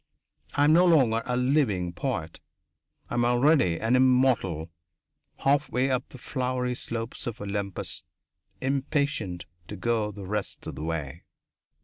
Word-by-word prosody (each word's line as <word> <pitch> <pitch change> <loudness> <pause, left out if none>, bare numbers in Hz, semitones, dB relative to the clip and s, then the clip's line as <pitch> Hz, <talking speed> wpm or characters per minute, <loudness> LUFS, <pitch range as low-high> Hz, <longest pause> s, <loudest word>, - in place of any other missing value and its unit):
I 145 - +3
am 150 +1 +6
no 180 +2 +6
longer 125 -9 +4
a 125 0 0
living 125 - +1
poet. 80 - -3 0.7
I - - -3
am 120 - +2
already 120 - +3
an 115 +3 +2
immortal 125 -11 +3 0.7
halfway 135 -2 +1
up 130 0 -1
the - - -11
flowery 125 -1 -2
slopes 115 -1 -5
of 120 0 -4
Olympus, 100 -1 -4 0.6
impatient 135 - -1 0.2
to - - -6
go 110 +1 0
the 100 -1 -9
rest 105 +1 -4
of - - -5
the - - -7
way. 80 -5 -4
120 Hz, 135 wpm, -27 LUFS, 100-135 Hz, 0.7 s, am